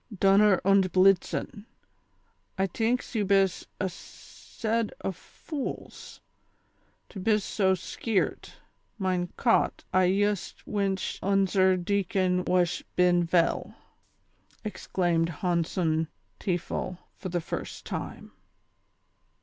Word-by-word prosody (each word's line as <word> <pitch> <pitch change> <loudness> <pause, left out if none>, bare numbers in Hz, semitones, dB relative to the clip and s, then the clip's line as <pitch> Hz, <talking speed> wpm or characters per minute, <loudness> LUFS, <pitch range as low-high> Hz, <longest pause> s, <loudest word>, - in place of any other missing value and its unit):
"Dunner 195 0 +5
und 195 -1 +4
blitzen, 195 +3 +2 0.9
I 190 - +2
tinks 225 +8 -1
you 220 -3 +1
bis 195 -1 +2
a 190 - 0
sed 220 +5 -5
o' - - 0
fools, 270 - -7 0.9
to 195 - -8
bis 210 +1 +2
so 190 -3 +2
skeert; 200 +3 -2 0.4
mine 185 -3 -1
Cot, 230 - +2
I 185 0 +5
yust 205 +1 0
winch 195 -2 -1
unzer 190 -1 +3
decon 185 -1 0
whash 180 -1 +2
bin 175 -1 +4
veil," 170 0 +1 0.9
exclaimed 175 -5 0
Honson 165 -1 0 0.3
Teafel, 180 0 -2 0.2
for 185 - -5
the 175 0 -1
first 160 - -6
time. - - -6
190 Hz, 100 wpm, -28 LUFS, 180-200 Hz, 0.9 s, Dunner